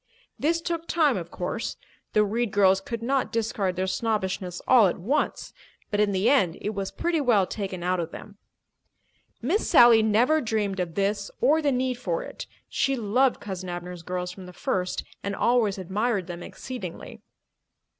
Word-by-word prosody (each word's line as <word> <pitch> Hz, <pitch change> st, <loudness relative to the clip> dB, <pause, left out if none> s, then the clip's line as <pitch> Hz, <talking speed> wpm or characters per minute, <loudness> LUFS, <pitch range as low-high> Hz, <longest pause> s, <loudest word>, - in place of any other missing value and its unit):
This 330 Hz, +3 st, +1 dB
took 335 Hz, 0 st, -3 dB
time, 305 Hz, -5 st, +3 dB
of 170 Hz, -3 st, -5 dB
course. 180 Hz, +7 st, -4 dB, 0.4 s
The 210 Hz, 0 st, +4 dB
Reed 230 Hz, +3 st, -1 dB
girls 195 Hz, -1 st, +4 dB
could 230 Hz, +3 st, -5 dB
not 270 Hz, +2 st, 0 dB
discard 210 Hz, -5 st, -1 dB
their 185 Hz, -, -1 dB
snobbishness 190 Hz, -4 st, -2 dB
all 240 Hz, -6 st, +7 dB
at 175 Hz, -, -2 dB
once. 265 Hz, -, -1 dB, 0.4 s
But 205 Hz, -, 0 dB
in 210 Hz, -1 st, +3 dB
the 195 Hz, +3 st, +1 dB
end 190 Hz, -12 st, +3 dB
it 210 Hz, -, -3 dB
was 195 Hz, -2 st, -3 dB
pretty 335 Hz, -2 st, -1 dB
well 225 Hz, -8 st, +4 dB
taken 190 Hz, -3 st, -5 dB
out 180 Hz, 0 st, +1 dB
of 165 Hz, -1 st, -2 dB
them. 205 Hz, +3 st, -11 dB, 1.0 s
Miss 350 Hz, -, +1 dB
Sally 240 Hz, -7 st, +8 dB
never 240 Hz, +9 st, +3 dB
dreamed 210 Hz, -4 st, -1 dB
of 175 Hz, -2 st, -3 dB
this 200 Hz, 0 st, 0 dB
or 300 Hz, +6 st, +4 dB
the 290 Hz, -2 st, +2 dB
need 255 Hz, -1 st, -1 dB
for 175 Hz, -8 st, -2 dB
it. -, -, -8 dB, 0.2 s
She 275 Hz, 0 st, 0 dB
loved 250 Hz, +3 st, +2 dB
Cousin 190 Hz, -2 st, -6 dB
Abner's 175 Hz, 0 st, -6 dB
girls 180 Hz, +1 st, -4 dB
from 185 Hz, 0 st, -11 dB
the 180 Hz, -, -11 dB
first 180 Hz, 0 st, -2 dB, 0.2 s
and 200 Hz, 0 st, -3 dB
always 230 Hz, -4 st, +2 dB
admired 195 Hz, +2 st, -1 dB
them 175 Hz, -1 st, -7 dB
exceedingly. 200 Hz, -7 st, -8 dB
210 Hz, 175 wpm, -26 LUFS, 185-245 Hz, 1.0 s, Sally